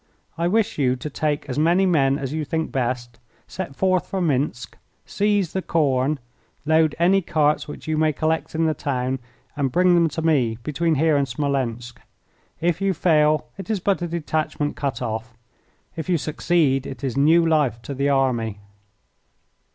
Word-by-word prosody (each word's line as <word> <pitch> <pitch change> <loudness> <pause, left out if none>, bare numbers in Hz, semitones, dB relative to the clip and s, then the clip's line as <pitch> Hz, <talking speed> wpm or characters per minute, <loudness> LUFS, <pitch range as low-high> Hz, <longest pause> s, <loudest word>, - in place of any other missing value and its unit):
I 170 +1 0
wish 210 -2 +1
you 130 -2 +2
to 130 +4 -6
take 150 0 -2
as 135 +1 -2
many 175 +5 +3
men 140 -6 +3
as 135 -1 -4
you 155 0 -2
think 160 +2 -2
best, 120 -2 -3 0.3
set 180 -7 -6
forth 185 0 +1
for 190 - -3
Minsk, 140 -7 -1 0.3
seize 205 -4 0
the 190 - -1
corn, 145 -4 +1 0.5
load 160 0 +3
any 185 +4 +4
carts 150 -3 +1
which 150 - -9
you 155 -1 0
may 155 0 +3
collect 160 +2 -1
in 165 +1 +1
the 160 - +2
town, 130 -2 -2 0.4
and 140 -3 -1
bring 180 +3 +4
them 170 -1 +4
to 160 +2 -4
me 130 -9 +2
between 160 +2 0
here 155 +1 +3
and 140 -1 +1
Smolensk. 125 -5 -3 0.6
If 170 +2 0
you 195 -1 +1
fail 155 -3 +3
it 195 - -7
is 215 -3 0
but 190 0 0
a 175 - -1
detachment 155 -3 -2
cut 140 -5 -3
off. 115 +1 -4 0.6
If 165 +2 -5
you 175 - +3
succeed 150 -3 +1
it 135 - -8
is 130 -2 -2
new 160 +5 +4
life 150 -8 +2
to 140 - -5
the 140 +1 0
army." 125 -6 +1
150 Hz, 175 wpm, -22 LUFS, 135-170 Hz, 0.6 s, any